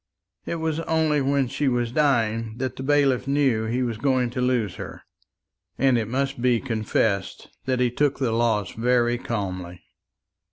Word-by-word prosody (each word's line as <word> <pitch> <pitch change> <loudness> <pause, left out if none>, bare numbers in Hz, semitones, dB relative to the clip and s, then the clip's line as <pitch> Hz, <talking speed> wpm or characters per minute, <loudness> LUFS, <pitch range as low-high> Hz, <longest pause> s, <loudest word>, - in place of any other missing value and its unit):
It - - -2
was 160 -1 -2
only 160 -3 +1
when 135 -1 +1
she 140 +3 -1
was 120 -2 0
dying 115 -6 +1
that 130 0 -3
the - - -7
bailiff 135 -2 +2
knew 135 -6 +2
he 120 +3 -1
was 115 -3 -3
going 130 -2 +1
to 125 - -3
lose 125 -6 0
her; - - -8 0.7
and 135 -1 +3
it 115 -3 0
must 135 +1 -2
be 125 -2 +3
confessed 110 -4 -1 0.2
that 130 -1 0
he 125 -1 +2
took 145 +2 +1
the 130 -4 0
loss 110 -4 +1
very 120 0 +1
calmly. 90 -6 -4
125 Hz, 165 wpm, -24 LUFS, 115-135 Hz, 0.7 s, and